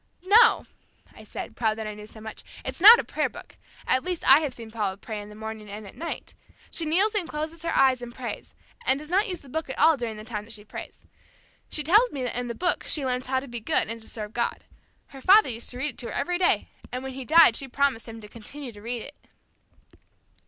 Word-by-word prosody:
"No," 435 +5 +6 0.5
I - - -13
said, - - -7
proud 220 -2 0
that 220 - -4
I 215 - -4
knew 210 0 -10
so 220 - -13
much, 220 0 -8 0.2
"it's - - -5
not 440 +5 +11
a - - -1
prayer - - -1
book. - - -13 0.3
At 260 - +2
least 360 -2 -3
I 270 +2 +9
have 300 -4 -2
seen 225 -2 -10
Paula 205 -4 -2
pray 210 0 -6
in 205 - -10
the 210 - -12
morning 220 -1 -7
and 210 +1 -7
at 195 - -11
night. 335 +1 -6 0.4
She 330 - -1
kneels 385 +7 +3
and 380 -6 -1
closes 310 +2 -4
her 335 - -1
eyes 260 -2 +4
and 240 -1 -7
prays, 240 0 -7 0.3
and 265 - +3
does 305 +3 -9
not 400 +5 +3
use 360 -4 -4
the 280 - -16
Book 310 +2 -4
at - - -5
all 315 0 +5
during 230 -4 -4
the 215 - -8
time 215 -2 -5
that 230 - -7
she 210 - -8
prays. - - -9 0.6
She 300 - -1
tells 425 - +5
me 270 - -4
that 245 - -2
in 245 - -3
the 235 - -4
Book 355 0 -1
she 290 -4 0
learns 250 0 -1
how 260 0 +1
to 275 - -9
be 240 -1 -6
good 215 - +1
and 230 0 -5
to 220 - -11
serve 210 -1 -6
God. 235 - -2 0.5
Her 270 - -11
father 405 +5 +6
used 230 -1 -2
to 245 - -6
read 295 +4 -2
it - - -25
to 240 - -4
her - - -6
every 350 +5 -1
day, 365 - +2 0.2
and 250 +1 -4
when 265 0 -5
he 265 0 -6
died 315 -4 +7
she 270 - -3
promised 270 -3 0
him 225 0 -8
to 210 - -10
continue 240 +5 -9
to 205 -2 -14
read 235 +1 -4
it." 290 - -11
255 Hz, 260 wpm, -26 LUFS, 225-315 Hz, 0.6 s, not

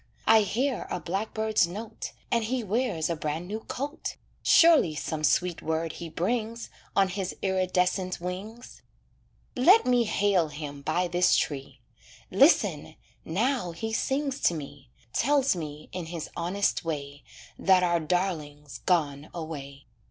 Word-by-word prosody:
I 220 0 +7
hear 245 +5 -1
a 180 - -2
blackbird's 215 +2 0
note, 215 +5 -7 0.2
And 235 -2 +2
he 250 +1 -1
wears 205 -6 0
a 170 - -1
brand 155 +3 -3
new 215 +3 -4
coat; 280 +6 -5 0.3
Surely 320 - +6
some 155 0 -4
sweet 175 +2 +2
word 160 +1 -1
he 170 -1 -7
brings, 225 +7 -2 0.2
On 195 -1 +4
his 185 0 -4
iridescent 185 -1 0
wings. 195 +7 -7 0.7
Let 360 - +6
me 245 -2 +3
hail 200 -5 +2
him 145 -1 -7
by 170 +5 0
this 175 +1 +3
tree. 135 -3 -3 0.5
Listen! - - +3 0.3
now 200 +1 0
he 220 +6 -4
sings 275 +3 -1
to 170 - +4
me, 140 -3 -9 0.2
Tells 275 -2 +3
me, 150 -3 -7
in 180 -3 -5
his 165 -2 -6
honest 185 +4 0
way, 145 -3 -5 0.4
That 185 -1 +4
our 175 -1 +2
darling's 150 -5 -2
gone 150 -5 0
away. 140 -4 -7
180 Hz, 135 wpm, -27 LUFS, 155-220 Hz, 0.7 s, I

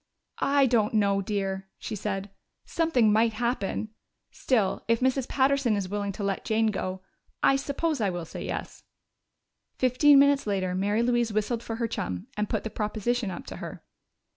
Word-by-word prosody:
"I 280 0 +3
don't 225 -3 +2
know, 200 -2 +3
dear," 195 -1 -3
she 220 - -5
said. 195 -1 -4 0.3
"Something 255 -11 +2
might 225 +1 +3
happen. 220 -2 -2 0.4
Still, 220 -7 0
if 230 0 +3
Mrs. 260 0 +1
Patterson 270 -4 +2
is 195 -2 -2
willing 205 0 -2
to 205 - -5
let 195 -1 -1
Jane 220 0 +2
go, 185 -1 -4 0.4
I 275 - +5
suppose 280 +1 -1
I 205 - +2
will 175 -2 -4
say - - -7
yes." - - -5 0.9
Fifteen 260 +3 +5
minutes 280 -2 +4
later 190 -3 0
Mary 205 +5 +1
Louise 240 -1 +1
whistled 215 +3 -1
for 230 -1 -5
her 230 0 -1
chum 90 - -4
and 210 0 -2
put - - -1
the 220 - -5
proposition 220 +1 -1
up 175 - -7
to - - -8
her. - - -8
220 Hz, 170 wpm, -27 LUFS, 200-250 Hz, 0.9 s, I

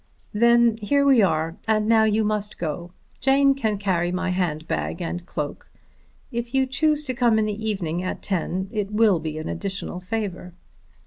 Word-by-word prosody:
"Then 235 +1 +4
here 280 +7 +2
we 270 -5 +6
are, 165 -2 +1
and 215 -1 +2
now 220 -1 +5
you 220 0 +2
must 210 -1 -2
go. 170 +2 -4 0.3
Jane 275 +1 +4
can 220 -6 -1
carry 180 -3 0
my 185 0 -1
hand 165 -4 -2
bag - - -2
and 175 0 -4
cloak. 150 -2 -5 0.6
If 235 +1 -4
you 265 0 +4
choose 300 +3 +1
to 255 - -1
come 240 -2 +3
in 215 - +2
the 210 +1 -4
evening 175 -4 -2
at 185 - -4
ten 190 0 -2
it 210 -2 -2
will 210 -4 +3
be 155 -1 -5
an 155 - -5
additional 190 -2 -4
favour." 185 -3 -4
210 Hz, 180 wpm, -24 LUFS, 180-235 Hz, 0.6 s, we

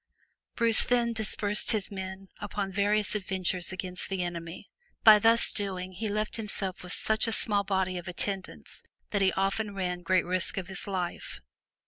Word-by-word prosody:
Bruce 230 -1 +5
then 240 -1 +1
dispersed 210 -1 +1
his 210 -2 -2
men 190 0 -7
upon 195 -2 -4
various 205 +1 +1
adventures 185 -3 -1
against 185 -1 -5
the 190 -2 -1
enemy, 170 -1 -6 0.4
but 220 - +10
by 210 - +7
thus 225 +2 +4
doing, 185 -3 -1
he 210 +4 -4
left 215 +2 -1
himself 200 -4 0
with 180 - -9
such 220 +4 +1
a - - -1
small 205 -2 +1
body 190 -2 -1
of 175 - -11
attendants 190 +2 -4 0.3
that 205 - 0
he 190 -1 +4
often 200 +2 -1
ran 180 -2 -3
great 185 +1 +1
risk 185 +3 +2
of 190 0 -4
his 190 +1 -6
life. 185 -3 -4
195 Hz, 170 wpm, -28 LUFS, 185-210 Hz, 0.4 s, but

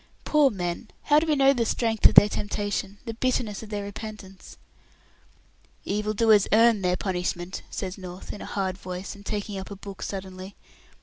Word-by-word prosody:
"Poor 300 -2 +4
men! 180 0 -4
How 295 0 +5
do 325 - -3
we 305 - +3
know 275 0 +5
the 240 -3 +1
strength 225 -1 +3
of - - -1
their 205 - +10
temptation, 205 -1 -3
the 230 - -4
bitterness 230 -3 -1
of 220 - -10
their 205 -1 -3
repentance?" 200 -2 -9 1.3
"Evil 210 +1 -1
doers 215 -2 +5
earn 225 -1 +5
their 180 -1 +1
punishment," 180 -1 -3
says 190 0 -5
North, 180 0 -8
in 205 - -9
a - - -6
hard 190 -2 -2
voice, 185 +1 -6
and 200 - -13
taking 205 -1 -4
up 190 - -8
a 200 - -7
book 200 0 -10
suddenly. 190 0 -6
205 Hz, 180 wpm, -26 LUFS, 190-225 Hz, 1.3 s, their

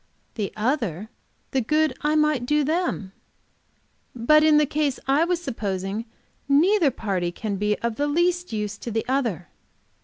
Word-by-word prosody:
The 205 -2 -3
other 220 - -1 0.4
the 265 - +1
good 305 +3 +1
I 300 +1 +1
might 300 -5 +2
do 300 +1 +2
them." 310 - -1 1.0
"But 305 +6 +4
in 310 -1 +5
the 300 - +4
case 290 -1 -1
I 285 +5 +3
was 350 0 -1
supposing, 205 - -3 0.4
neither 330 +4 +4
party 190 -8 -2
can 200 +2 -4
be 210 +1 0
of 235 -1 -1
the 290 - 0
least 350 +4 +1
use 210 -2 -3
to - - -6
the 225 0 -2
other." 240 -10 -1
265 Hz, 155 wpm, -24 LUFS, 210-305 Hz, 1.0 s, in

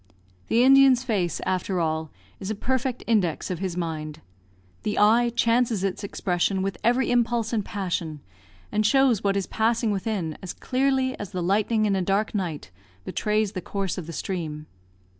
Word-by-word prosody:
The 235 +2 +3
Indian's 265 -1 +6
face, 195 - -1
after 185 0 -1
all, 160 -1 -1 0.3
is 190 - -5
a 215 - -1
perfect 255 +2 -2
index 190 -7 +1
of 175 - -3
his 185 -2 -3
mind. 155 -3 -4 0.6
The 210 - -2
eye 230 +3 +5
changes 230 -4 +2
its 195 +1 -2
expression 190 -1 -1
with 195 -3 -3
every 245 +2 +2
impulse 235 -1 +1
and 215 -3 +1
passion, 175 -7 -3 0.5
and 215 +1 +1
shows 255 -1 +3
what 200 -1 +1
is 195 - -1
passing 225 0 +1
within 195 -5 -2
as 185 -2 -6
clearly 260 0 0
as 205 -4 -7
the 180 -1 -2
lightning 215 +4 +2
in 200 -2 +2
a 190 - 0
dark 195 +4 0
night 170 - -3 0.3
betrays 210 -1 0
the 185 -3 -5
course 195 0 -3
of 165 - -8
the 165 - -6
stream. 155 -4 -4
200 Hz, 170 wpm, -25 LUFS, 180-230 Hz, 0.6 s, Indian's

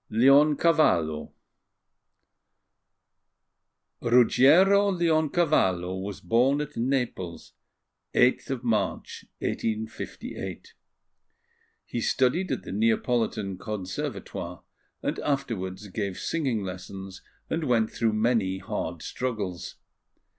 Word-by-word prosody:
LEONCAVALLO 135 - +4 2.7
RUGGIERO 160 - +5
LEONCAVALLO 155 - +2
was 100 0 -6
born 125 +10 +2
at 150 0 -5
Naples 115 -9 -2 0.6
8th 125 0 +2
March, 115 -3 -2 0.2
1858. 110 0 -4 1.1
He 120 - -4
studied 135 +12 +1
at - - -2
the - - -7
Neapolitan 110 -2 0
Conservatoire, 100 -4 -5 0.4
and - - -2
afterwards 105 -9 -3
gave 100 -1 -3
singing 130 -10 -1
lessons 95 +1 -8 0.3
and 160 -1 -2
went 115 -4 +2
through 115 -2 0
many 110 -4 +1
hard 85 -3 -4
struggles. 100 -8 -4
115 Hz, 80 wpm, -27 LUFS, 95-140 Hz, 2.7 s, RUGGIERO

